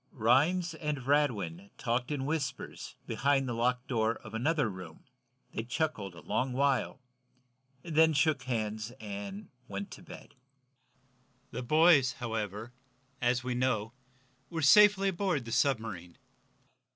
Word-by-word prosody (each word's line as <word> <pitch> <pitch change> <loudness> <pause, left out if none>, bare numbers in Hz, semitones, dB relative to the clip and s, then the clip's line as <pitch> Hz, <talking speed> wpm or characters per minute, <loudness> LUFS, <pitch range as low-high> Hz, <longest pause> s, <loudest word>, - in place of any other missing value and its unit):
Rhinds 150 +10 +2
and 150 -4 -4
Radwin 105 - 0
talked 125 +1 -1
in 140 -3 -2
whispers, 150 -2 -4
behind 140 -1 +1
the 120 - -2
locked 125 +2 0
door 115 -2 +1
of - - -12
another 145 +4 +1
room. 90 -5 -9 0.5
They - - -2
chuckled 115 - -3
a 85 - -11
long 130 0 -1
while, 135 -1 +1 0.8
then 160 -1 +4
shook 145 -1 +2
hands 110 -3 -3
and 100 -1 -7 0.2
went 100 -1 -6
to - - -10
bed. - - -12 1.2
The 125 - -4
boys, 155 0 +5
however, 110 -1 -4 0.5
as 120 0 +1
we 125 0 -2
know, 120 -3 0 0.6
were 165 -2 -3
safely 200 +4 +7
aboard 175 -8 -1
the 115 - -7
submarine. 110 - -1
125 Hz, 125 wpm, -31 LUFS, 110-150 Hz, 1.2 s, safely